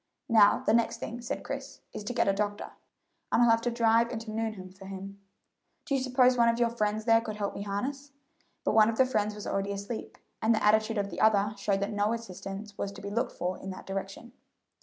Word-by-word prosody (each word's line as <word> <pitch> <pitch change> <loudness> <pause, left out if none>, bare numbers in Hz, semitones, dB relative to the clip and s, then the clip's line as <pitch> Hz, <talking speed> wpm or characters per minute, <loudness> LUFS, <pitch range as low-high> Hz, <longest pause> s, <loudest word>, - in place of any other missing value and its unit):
"Now, 215 -3 +5
the 215 - +3
next 230 0 +2
thing," 235 +2 -6
said 235 - -4
Chris, - - -6
"is - - -6
to 245 - -3
get 235 -3 +1
a 195 - +4
doctor, 205 +1 -2 0.6
and 240 - +4
I'll 235 - +6
have 225 0 +3
to 240 - 0
drive 230 0 +3
into 225 -2 -5
Nuneham 215 -4 -4
for 190 +1 -13
him. 195 +1 -8 0.7
Do 295 - -2
you 270 - +2
suppose 255 0 +4
one 235 -1 +5
of 230 - +1
your 235 -1 +2
friends 215 -1 -1
there 225 -1 +5
can 215 -2 -5
help 205 -1 -3
me - - -6
harness?" 265 +8 -4 0.5
but - - +1
one 215 0 +6
of 225 - -2
the 260 - +5
friends 215 -4 0
was 210 - -8
already 195 0 -1
asleep, 200 +3 -6 0.2
and 225 +1 +3
the 215 - -1
attitude 215 +1 +3
of 200 -1 -1
the - - -4
other 210 -1 +4
showed 200 -1 0
that 200 +2 -2
no 205 +2 +1
assistance 200 -2 -7
was 200 - -2
to 200 - -10
be 200 - -5
looked 235 +4 -1
for 180 +1 -3
in 195 - -7
that 185 - -8
direction. 195 +4 -6
215 Hz, 235 wpm, -29 LUFS, 200-230 Hz, 0.7 s, I'll